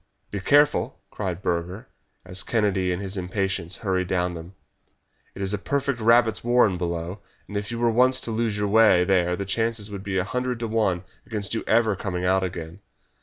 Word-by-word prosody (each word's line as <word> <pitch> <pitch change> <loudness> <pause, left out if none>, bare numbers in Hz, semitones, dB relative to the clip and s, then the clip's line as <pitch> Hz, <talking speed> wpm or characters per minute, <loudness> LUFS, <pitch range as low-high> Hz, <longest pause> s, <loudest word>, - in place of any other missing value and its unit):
"Be 100 - -3
careful!" 145 +9 +3
cried 95 -3 -4
Burger, 90 +7 -2 0.4
as 90 0 -4
Kennedy, 100 -5 +1
in 90 - -2
his 95 0 -4
impatience, 95 -1 -2
hurried 95 -2 +1
down 90 0 0
them. 85 +3 -9 0.8
"It 100 - -4
is 95 +1 -1
a 105 - -1
perfect 140 +2 -1
rabbits' 115 0 +4
warren 120 -5 +4
below, 85 +2 -3 0.3
and 105 - -9
if 100 0 -2
you 120 - -4
were 120 0 +2
once 130 +3 +4
to 115 - -3
lose 110 -2 -1
your 105 0 0
way 105 -4 +5
there 90 -1 +2
the 100 - -4
chances 110 +1 -1
would 100 -2 -5
be 95 -1 -3
a 95 - +2
hundred 125 +4 -2
to 115 - -1
one 105 -6 0 0.2
against 105 -3 -2
your 115 - -1
ever 110 -2 +3
coming 90 -2 -3
out 95 +1 +3
again. 85 -1 -5
100 Hz, 195 wpm, -24 LUFS, 90-115 Hz, 0.8 s, way